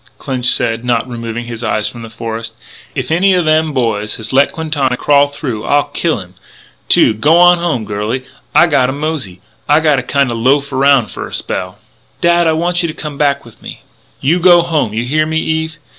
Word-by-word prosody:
Clinch 130 Hz, -3 st, -3 dB
said, 115 Hz, -1 st, +2 dB
not 120 Hz, 0 st, 0 dB
removing 115 Hz, -1 st, -5 dB
his 120 Hz, 0 st, -7 dB
eyes 110 Hz, -2 st, 0 dB
from 120 Hz, -, -8 dB
the 115 Hz, -, -9 dB
forest: 115 Hz, 0 st, -5 dB, 0.4 s
"If 135 Hz, -1 st, -3 dB
any 185 Hz, +3 st, +3 dB
o' 180 Hz, -, +1 dB
them 155 Hz, 0 st, +2 dB
boys 110 Hz, -6 st, -1 dB
has 110 Hz, +3 st, -6 dB
let 140 Hz, +2 st, +4 dB
Quintana 145 Hz, -6 st, -1 dB
crawl 145 Hz, +1 st, +3 dB
through 130 Hz, -6 st, -5 dB
I'll 145 Hz, 0 st, +1 dB
kill 170 Hz, -2 st, 0 dB
him, 90 Hz, -2 st, -12 dB, 0.6 s
too.... -, -, +5 dB
G'wan 170 Hz, +9 st, +4 dB
home, 155 Hz, -10 st, -1 dB
girlie. 105 Hz, +6 st, -3 dB, 0.3 s
I 175 Hz, -, +7 dB
gotta 135 Hz, -6 st, +1 dB
mosey 140 Hz, -, -4 dB, 0.3 s
I 150 Hz, +1 st, +5 dB
gotta 150 Hz, -4 st, +2 dB
kinda 135 Hz, 0 st, 0 dB
loaf 140 Hz, +5 st, +1 dB
around 135 Hz, -2 st, +3 dB
f'r -, -, -7 dB
a -, -, -13 dB
spell -, -, -4 dB, 0.2 s
" -, -, -38 dB
"Dad, 170 Hz, 0 st, +3 dB
I 160 Hz, -, +3 dB
want 175 Hz, +2 st, 0 dB
you 170 Hz, -, -1 dB
to 155 Hz, -, -6 dB
come 150 Hz, -2 st, -7 dB
back 140 Hz, -2 st, +1 dB
with 115 Hz, -, -17 dB
me -, -, -10 dB, 0.2 s
" -, -, -36 dB
"You 160 Hz, +7 st, +2 dB
go 175 Hz, -1 st, +6 dB
home; 160 Hz, -10 st, -1 dB
you 110 Hz, +3 st, -2 dB
hear 155 Hz, +4 st, +1 dB
me, 160 Hz, 0 st, -1 dB
Eve? 160 Hz, 0 st, -2 dB
140 Hz, 205 wpm, -14 LUFS, 115-160 Hz, 0.6 s, I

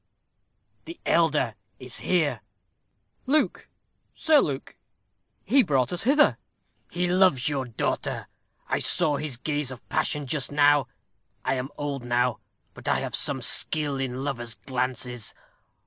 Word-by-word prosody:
"The 335 Hz, -, -9 dB
elder 150 Hz, -8 st, +2 dB, 0.2 s
is 125 Hz, -2 st, -7 dB
here." 150 Hz, -11 st, +1 dB, 0.9 s
"Luke 300 Hz, +3 st, +1 dB, 0.5 s
Sir 310 Hz, -2 st, +5 dB
Luke. 140 Hz, -, -2 dB, 0.7 s
He 265 Hz, +7 st, +5 dB
brought 140 Hz, -, +1 dB
us 175 Hz, -, -3 dB
hither." 290 Hz, +4 st, +4 dB, 0.5 s
"He 180 Hz, +1 st, -1 dB
loves 180 Hz, -8 st, +4 dB
your 140 Hz, -3 st, 0 dB
daughter. 115 Hz, -3 st, -2 dB, 0.4 s
I -, -, 0 dB
saw 160 Hz, -4 st, +3 dB
his 145 Hz, -5 st, -3 dB
gaze 145 Hz, +1 st, -2 dB
of 130 Hz, -2 st, -9 dB
passion 150 Hz, -1 st, 0 dB
just 135 Hz, +1 st, -2 dB
now. 145 Hz, -1 st, +4 dB, 0.6 s
I -, -, +2 dB
am 130 Hz, +1 st, -3 dB
old 140 Hz, -3 st, -3 dB
now, 120 Hz, 0 st, +1 dB, 0.3 s
but -, -, -11 dB
I -, -, +2 dB
have -, -, -4 dB
some -, -, 0 dB
skill 145 Hz, -3 st, 0 dB
in 130 Hz, 0 st, -3 dB
lovers' 120 Hz, -5 st, -3 dB
glances. 125 Hz, -2 st, -3 dB
140 Hz, 130 wpm, -26 LUFS, 125-160 Hz, 0.9 s, Sir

